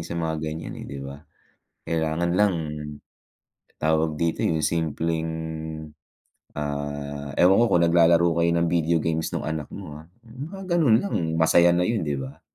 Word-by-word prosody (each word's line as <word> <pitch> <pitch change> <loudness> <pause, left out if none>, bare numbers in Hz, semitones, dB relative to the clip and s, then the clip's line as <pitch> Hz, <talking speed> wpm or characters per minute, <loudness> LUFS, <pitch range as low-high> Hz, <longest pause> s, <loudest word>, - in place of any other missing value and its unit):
sa 85 +1 -5
mga 80 -2 -2
ganiyan, 80 +1 -5
eh, - - -8
'di 70 - -7
ba. 70 +1 -8 0.7
Kailangan 80 +1 0
lang, 105 -1 +4 1.2
tawag 80 0 +1
dito, 85 +1 -1
'yong 80 -2 0
simpleng, 80 0 -1 1.3
ah, 70 -1 -4
ewan 95 +4 +5
ko 120 - +5
kung 85 -4 +3
naglalaro 85 0 +5
kayo 85 0 +3
ng 85 0 +2
video 85 -1 +2
games 80 0 -1
no'ng - - -2
anak 75 -2 -4
mo, 75 -7 -9
ah. 80 - -15 0.2
'Yong 125 +5 -8
mga 195 +2 -9 0.2
gano'n 125 -9 +5
lang 200 - -2 0.2
masaya 85 +2 +5
na 90 - +2
'yon, 105 -5 -1
'di 70 - 0
ba. 70 +3 -7
80 Hz, 165 wpm, -24 LUFS, 75-85 Hz, 1.3 s, ewan